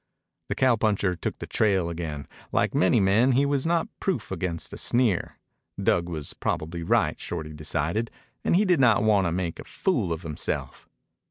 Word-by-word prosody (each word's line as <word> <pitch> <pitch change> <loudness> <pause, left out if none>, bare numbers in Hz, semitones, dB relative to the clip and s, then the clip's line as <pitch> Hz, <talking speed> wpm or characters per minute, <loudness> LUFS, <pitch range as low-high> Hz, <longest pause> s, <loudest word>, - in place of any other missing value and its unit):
The - - -1
cowpuncher 110 -7 +2
took - - -4
the - - -6
trail 95 -5 +1
again. 80 -5 -5 0.2
Like - - +1
many 95 +5 +3
men, 105 +7 +4
he 135 +3 +3
was 140 +1 0
not 170 -1 +1
proof 160 - -2
against 90 -3 -3
a - - -6
sneer. 120 -7 +1 0.4
Dug 85 0 +1
was 75 -4 -5
probably 85 +2 -3
right, 85 - +1
Shorty 80 -3 -5
decided, 80 +8 -2 0.3
and - - +2
he 205 +4 +4
did 180 -5 +3
not 120 -5 +5
want 105 -4 +3
to - - -1
make 85 -1 -2
a - - -6
fool 120 - -1
of 85 +1 -3
himself. 75 -3 -4
95 Hz, 175 wpm, -26 LUFS, 85-120 Hz, 0.4 s, not